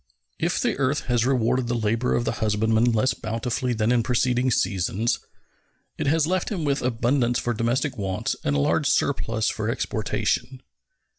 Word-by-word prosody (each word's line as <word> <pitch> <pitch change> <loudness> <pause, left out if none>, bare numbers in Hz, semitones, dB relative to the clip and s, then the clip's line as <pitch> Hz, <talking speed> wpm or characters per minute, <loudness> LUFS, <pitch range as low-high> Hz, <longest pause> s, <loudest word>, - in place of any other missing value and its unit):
If - - 0
the - - 0
earth 140 +2 +1
has 120 -1 0
rewarded 125 -1 +1
the 120 - -1
labor 115 +2 0
of 120 - 0
the - - +1
husbandman 110 +1 +2
less 115 +4 +2
bountifully 115 +3 -2
than 110 0 +1
in 125 -1 +3
preceding 125 +1 +1
seasons, 105 +1 0 0.8
it - - -3
has 155 +1 +3
left 185 +2 -1
him 180 -7 -3
with 140 -1 0
abundance 120 0 +1
for 120 - -1
domestic 120 +4 -1
wants 95 -2 -2
and 70 - 0
a - - +2
large 70 - +2
surplus 110 -1 0
for 110 0 -3
exportation. 115 +1 -2
120 Hz, 165 wpm, -24 LUFS, 110-130 Hz, 0.8 s, in